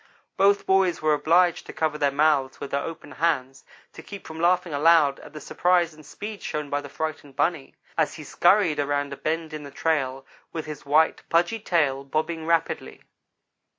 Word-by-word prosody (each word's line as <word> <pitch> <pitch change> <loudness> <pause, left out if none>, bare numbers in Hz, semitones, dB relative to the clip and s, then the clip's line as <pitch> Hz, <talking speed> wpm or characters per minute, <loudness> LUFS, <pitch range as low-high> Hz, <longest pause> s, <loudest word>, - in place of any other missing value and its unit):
Both 200 +1 +3
boys 190 -2 +2
were 155 0 +2
obliged 170 +4 +2
to - - -8
cover 155 -1 -1
their 145 - +3
mouths 140 -2 +1
with 140 - -7
their 140 - 0
open 165 -3 -8
hands 135 -5 -1 0.3
to - - -10
keep 200 -2 -10
from 160 0 -8
laughing 175 -1 +2
aloud 150 -1 +4
at - - -13
the 155 - -7
surprise 175 +2 +1
and 155 0 -15
speed 210 +7 -8
shown 150 -2 -4
by 145 0 0
the 145 - -10
frightened 155 -2 -5
bunny, 145 0 -1 0.2
as 160 - +1
he 155 - -9
scurried 175 +2 +3
around 145 0 -1
a - - -5
bend 160 +2 -3
in 155 - -5
the 145 - -9
trail, 135 -3 -1 0.3
with 160 - -5
his 150 -2 -9
white, 155 +3 +3
pudgy 175 +7 +2
tail 150 -9 0
bobbing 160 +3 -3
rapidly. 165 - -1
155 Hz, 185 wpm, -25 LUFS, 145-170 Hz, 0.3 s, aloud